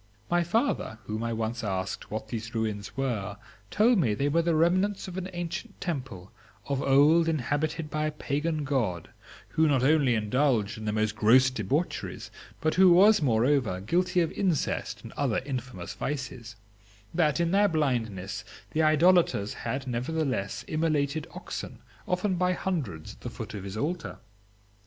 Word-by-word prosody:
My 175 0 +3
father, 220 - 0
whom 110 +3 -4
I 115 - -1
once 115 +1 -2
asked 95 -2 -3
what 110 0 -5
these 115 +1 -5
ruins 105 -2 -3
were, 105 -7 -2 0.3
told 225 +1 +4
me 115 -10 +2
that - - -12
they 140 +4 +1
were 165 +3 +3
the 165 -1 +1
remnants 185 +6 +2
of 180 - -7
an 190 0 -4
ancient 175 +5 -5
temple, 130 - -5 0.3
of 140 0 -1
old 150 +5 +5
inhabited 150 +2 -1
by 155 0 0
a - - -2
Pagan 150 +1 -2
God, 115 - -1 0.4
who 160 0 +2
not 135 -4 +2
only 140 -4 +4
indulged 110 0 +1
in 110 - -8
the 105 - 0
most 110 0 0
gross 130 +5 +5
debaucheries, 120 - -2 0.3
but 155 -1 +1
who 185 -1 +6
was, 200 +3 +6
moreover, 120 -5 +2
guilty 180 - +1
of 165 - 0
incest 180 -7 -1
and - - -9
other 135 -6 0
infamous 125 -9 -5
vices; 130 -4 -5 0.6
that 160 -2 +2
in 170 0 +1
their 205 +2 +4
blindness 115 - -1 0.3
the 160 - +1
idolators 155 - +4
had, 135 0 -4
nevertheless, 130 -3 -2
immolated 155 -1 0
oxen, - - -6 0.3
often 180 +1 0
by 180 +1 +2
hundreds, 145 - -3
at - - -20
the - - -5
foot - - -7
of 100 -3 -6
his 100 +1 -6
altar. 165 +8 -3
140 Hz, 160 wpm, -28 LUFS, 110-165 Hz, 0.6 s, who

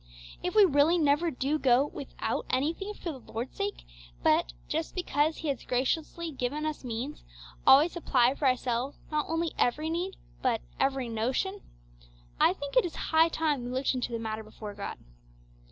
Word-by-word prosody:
If 360 - -3
we 420 -2 +8
really 305 +1 +4
never 305 +2 +3
do 285 +2 -1
go 255 0 +4
without 285 -2 -4
anything 330 +10 -1
for 340 - -4
the 270 - -8
Lord's 235 +4 -4
sake, 200 - -3 0.4
but, - - +3 0.2
just 160 - -2
because 315 -3 +1
He 320 - -5
has 275 - -2
graciously 320 +6 -1
given 280 +3 -2
us 310 -2 -3
means, 250 +5 -5 0.4
always 290 +6 +8
supply 255 -7 +3
for 280 0 0
ourselves 255 +1 0
not 300 -1 0
only 330 0 0
every 305 +6 +1
need 360 +3 -2 0.3
but 240 -4 +1 0.2
'every 270 -2 +1
notion,' 255 - -1 0.8
I - - +5
think 285 +7 -7
it - - +6
is 345 - -4
high 320 +1 +3
time 305 -6 0
we 245 - -4
looked 260 +2 0
into 250 -1 -2
the 230 - -1
matter 220 -1 -4
before 215 -1 -8
God. 200 0 -6
280 Hz, 170 wpm, -29 LUFS, 245-320 Hz, 0.8 s, we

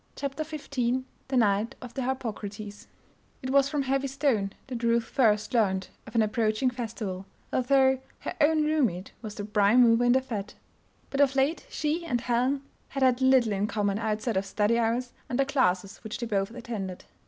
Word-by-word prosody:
CHAPTER 280 +2 -3
XV 260 -5 -2 0.2
THE 265 -1 0
NIGHT 210 -1 +2
OF 245 -1 -9
THE 270 - -3
HARPOCRATES 215 -5 -5 0.6
It 260 - -2
was 275 0 +4
from 290 -2 0
Heavy 270 +1 0
Stone 260 -8 0
that 245 -3 -5
Ruth 235 0 +2
first 215 -3 +1
learned 190 -5 +1 0.2
of - - -11
an 225 - +5
approaching 215 +3 +1
festival, 220 -6 -5 0.3
although 265 0 +3 0.2
her - - -4
own 305 +1 +4
room 305 -4 +3
mate 180 0 -7
was 215 -3 -7
the 205 - -5
prime 210 +3 +4
mover 230 0 +5
in 245 - +5
the 260 - +3
fete. 210 -6 -5 0.6
But 275 - +1
of 275 -1 +4
late 275 +5 +1
she 315 +3 -1
and 245 -8 -1
Helen 250 +3 0 0.2
had 275 -1 -2
had 255 0 +3
little 260 -4 +4
in 200 +1 0
common 205 -2 0
outside 220 0 -1
of 195 - 0
study 215 +4 +1
hours 235 +2 0 0.2
and 245 - -1
the 275 - +3
classes 195 -9 +1
which 220 - -6
they 240 - -3
both 195 -3 0
attended. 225 -6 -6
240 Hz, 190 wpm, -28 LUFS, 210-265 Hz, 0.6 s, an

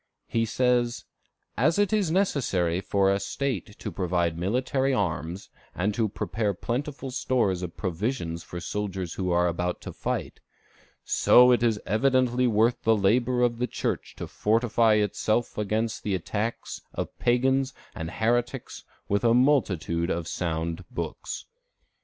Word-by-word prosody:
He 115 0 0
says: 120 0 +1 0.5
"As 155 +8 +2
it 205 0 +2
is 205 -6 +2
necessary 110 - +1
for 95 0 +2
a 100 - +1
State 115 -6 -3
to - - -5
provide 85 -3 0
military 130 - 0
arms, 90 -1 -2 0.2
and 100 +4 0 0.2
prepare 105 -3 -1
plentiful 135 - -4
stores 120 -8 0
of 85 -3 -6
provisions 85 -2 -2
for 85 - -7
soldiers 95 -2 -3
who 95 -2 -2
are 90 0 +3
about 90 +1 -2
to - - -7
fight, - - -3 0.6
so 125 +1 +6
it 120 - +3
is 115 -3 +2
evidently 125 +3 +2
worth 115 +2 +2
the 110 -1 +3
labor 120 +5 +2
of 120 -1 +1
the 125 - 0
Church - - -3
to - - -5
fortify 115 0 +2
itself 105 +2 0
against 110 +2 -1
the 100 -2 -1
attacks 105 +6 -3
of - - -4
pagans 130 +2 +2 0.2
and 80 0 -5
heretics 120 +5 -1 0.2
with 100 +2 0
a 115 0 +4
multitude 95 - +2
of 85 -2 -2
sound 85 +1 -2
books. - - -5
110 Hz, 140 wpm, -26 LUFS, 90-125 Hz, 0.6 s, so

